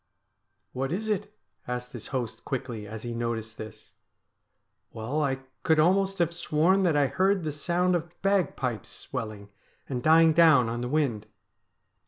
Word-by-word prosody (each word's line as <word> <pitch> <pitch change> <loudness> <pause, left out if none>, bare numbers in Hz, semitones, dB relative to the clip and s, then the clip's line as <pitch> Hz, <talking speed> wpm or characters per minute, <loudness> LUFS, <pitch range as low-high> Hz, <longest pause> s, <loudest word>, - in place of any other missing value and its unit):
' - - -50
What 135 +2 -2
is 215 +5 -1
it? 205 0 -2 0.2
' - - -51
asked 125 0 -4
his 120 -3 -8
host 125 -5 -4
quickly 120 -5 -4
as 110 +1 -8
he 120 -1 -4
noticed 115 -1 -4
this. 110 -1 -10 0.5
' - - -51
Well, 125 +8 -2
I 135 -2 0 0.2
could 160 -1 +3
almost 195 +4 +3
have 170 -1 +1
sworn 170 +3 +2
that 175 -5 +2
I 145 - +4
heard 190 +5 +1
the 155 - -2
sound 175 +5 +1
of 170 0 -5
bagpipes 155 - 0
swelling 110 -5 -6 0.4
and 125 -3 -3
dying 160 +2 +6
down 155 -8 +6
on 120 +1 -3
the 125 - -3
wind.' 130 -8 0
145 Hz, 170 wpm, -27 LUFS, 120-170 Hz, 0.5 s, dying